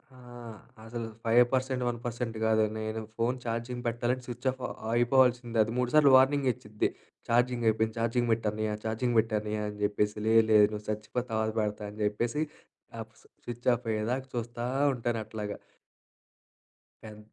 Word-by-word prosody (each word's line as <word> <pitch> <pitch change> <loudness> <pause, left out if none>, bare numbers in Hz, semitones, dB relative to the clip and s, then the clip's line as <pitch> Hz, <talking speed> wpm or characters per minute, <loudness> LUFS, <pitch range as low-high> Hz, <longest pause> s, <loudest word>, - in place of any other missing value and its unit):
ఆహ్, 120 -3 -11 0.3
అసలు 115 0 -5 0.2
5% 125 +2 +3
1% 120 -1 -4
కాదు. 110 0 +3
నేను 110 0 -3 0.2
ఫోన్ 120 +2 +1
ఛార్జింగ్ 120 +2 -3
పెట్టాలంటే 120 +2 -1
స్విచ్ 125 +2 -5
ఆఫ్ 130 0 -12 0.3
అయిపోవాల్సిందే. 120 -1 +3
అది 115 - -5
మూడు 125 -1 +1
సార్లు 145 -3 +6
వార్నింగే 135 0 +3
ఇచ్చిద్ది 105 0 -2 0.4
ఛార్జింగ్ 120 0 +2
అయిపోయింది 110 +1 +1
ఛార్జింగ్ 120 +1 0
పెట్టన్నయ్యా 110 -1 -1
ఛార్జింగ్ 115 +2 -1
పెట్టన్నయ్యా 105 -1 -1
అని 105 0 -9
చెప్పేసి 105 +1 0
లేదు, 115 0 +6
లేదు 105 -1 +8
నువ్వు 105 0 -6
సచ్చిపో 105 +3 -3
తర్వాత 110 0 0
పెడతా 105 0 -3
అని 105 - -13
చెప్పేసి. 120 +8 -1 0.6
ఆహ్, 115 - -5
ఫ్ - - -28 0.3
స్విచ్ 120 +1 -7
ఆఫ్ 120 - -10
అయ్యేదాకా 120 +5 -2
చూస్తా 120 0 -4 0.3
ఉంటానట్లాగా. 110 -3 -4 1.5
పెం 105 -1 -10
115 Hz, 140 wpm, -29 LUFS, 110-125 Hz, 1.5 s, లేదు